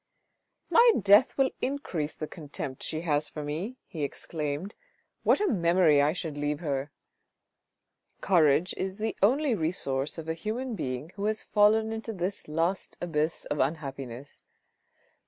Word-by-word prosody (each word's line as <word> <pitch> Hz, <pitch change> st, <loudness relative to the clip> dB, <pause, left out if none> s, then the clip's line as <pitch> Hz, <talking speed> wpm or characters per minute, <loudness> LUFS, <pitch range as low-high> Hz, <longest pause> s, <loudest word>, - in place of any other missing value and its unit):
My 470 Hz, 0 st, +7 dB
death 205 Hz, +4 st, +5 dB
will 270 Hz, -1 st, +3 dB
increase 190 Hz, -, -2 dB
the 155 Hz, -, -4 dB
contempt 145 Hz, -4 st, -7 dB
she 155 Hz, -, -2 dB
has 150 Hz, -3 st, 0 dB
for 150 Hz, -, -6 dB
me," 170 Hz, -, -4 dB
he 165 Hz, -5 st, -7 dB
exclaimed. 150 Hz, +5 st, -4 dB, 0.3 s
" -, -, -46 dB
What -, -, +4 dB
a 415 Hz, -, +2 dB
memory 170 Hz, -, +4 dB
I 145 Hz, +1 st, +3 dB
should 160 Hz, -3 st, -5 dB
leave 145 Hz, 0 st, -1 dB
her." 140 Hz, -3 st, -2 dB, 1.3 s
Courage 170 Hz, -2 st, +3 dB
is 190 Hz, +1 st, -3 dB
the 220 Hz, 0 st, -2 dB
only 265 Hz, +6 st, +3 dB
resource 155 Hz, -6 st, -1 dB
of 165 Hz, -1 st, -7 dB
a 160 Hz, -, 0 dB
human 230 Hz, +9 st, -4 dB
being 130 Hz, -, -4 dB
who 200 Hz, -, -2 dB
has 215 Hz, 0 st, -1 dB
fallen 220 Hz, +1 st, +3 dB
into 225 Hz, 0 st, -4 dB
this 185 Hz, +1 st, -3 dB
last 165 Hz, +5 st, -1 dB
abyss 160 Hz, -1 st, -1 dB
of 145 Hz, -, -3 dB
unhappiness. 135 Hz, -3 st, -4 dB
165 Hz, 150 wpm, -28 LUFS, 150-210 Hz, 1.3 s, My